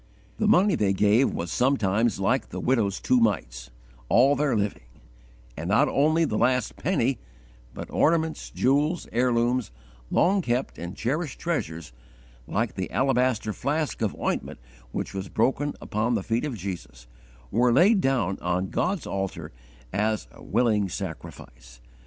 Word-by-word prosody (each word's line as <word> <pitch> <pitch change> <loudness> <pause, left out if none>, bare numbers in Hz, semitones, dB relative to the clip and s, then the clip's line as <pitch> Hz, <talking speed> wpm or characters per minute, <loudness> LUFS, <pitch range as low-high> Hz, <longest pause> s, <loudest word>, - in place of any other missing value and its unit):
The 215 - +2
money 205 -1 +5
they 100 -10 +1
gave 105 +7 +3
was 85 -1 -4
sometimes 115 -5 +1
like 125 +7 0
the - - -6
widow's 110 -6 +1
two 125 - +2
mites - - -1 0.4
all 135 +4 +5
their 140 -6 +1
living; 100 -12 -3 0.7
and 80 +4 -5
not 105 +3 +4
only 155 +3 +2
the 105 - -1
last 125 -2 +1
penny, - - 0 0.6
but - - -6
ornaments, 160 0 +1
jewels, 145 +6 +1
heirlooms, 120 0 +1 0.4
long 195 +2 +3
kept 125 -3 -2
and 85 +2 -7
cherished 140 +4 -2
treasures, 85 - -3 0.5
like - - -1
the - - -4
alabaster 125 -1 +1
flask 145 +3 -2
of 110 -3 0
ointment - - -2 0.3
which - - -4
was 95 -1 -5
broken 140 +5 0
upon 115 +3 -1
the 100 - -1
feet 115 +6 -1
of 140 -5 -3
Jesus, 85 -11 -7 0.5
were 120 +3 +3
laid 190 - +5
down 125 - 0
on 90 +1 -1
God's 185 -2 -1
altar 95 -1 -4 0.4
as 110 +1 0
a - - -16
willing 105 -3 +1
sacrifice. - - -8
120 Hz, 145 wpm, -26 LUFS, 100-140 Hz, 0.7 s, money